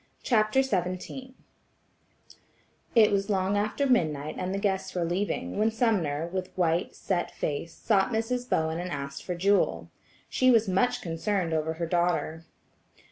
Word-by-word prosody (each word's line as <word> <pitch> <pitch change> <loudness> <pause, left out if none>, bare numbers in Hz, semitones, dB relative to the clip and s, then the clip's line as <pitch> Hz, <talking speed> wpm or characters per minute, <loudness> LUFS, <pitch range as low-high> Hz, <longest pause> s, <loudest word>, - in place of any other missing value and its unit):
CHAPTER 225 +2 +3
XVII 255 +4 -3 1.6
It 220 -3 +6
was 200 +1 0
long 195 0 +1
after 215 +7 0
midnight 155 - +1
and 185 0 -2
the 195 - -1
guests 195 -2 -1
were 175 -2 0
leaving, 190 +4 -2
when 215 +1 +3
Sumner, 195 - 0
with 185 +1 -4
white, 170 -1 +1
set 180 -3 -1
face, 155 +3 -4
sought 200 -2 +2
Mrs. 245 +2 -2
Bowen 160 +1 0
and 180 +1 -4
asked 140 -2 -5
for 180 - -3
Jewel. 195 +3 +1 0.4
She 255 - +2
was 230 -3 +5
much 195 +6 +1
concerned 170 +1 -1
over 160 0 0
her 170 +1 -3
daughter. 165 -1 0
185 Hz, 145 wpm, -28 LUFS, 165-215 Hz, 1.6 s, It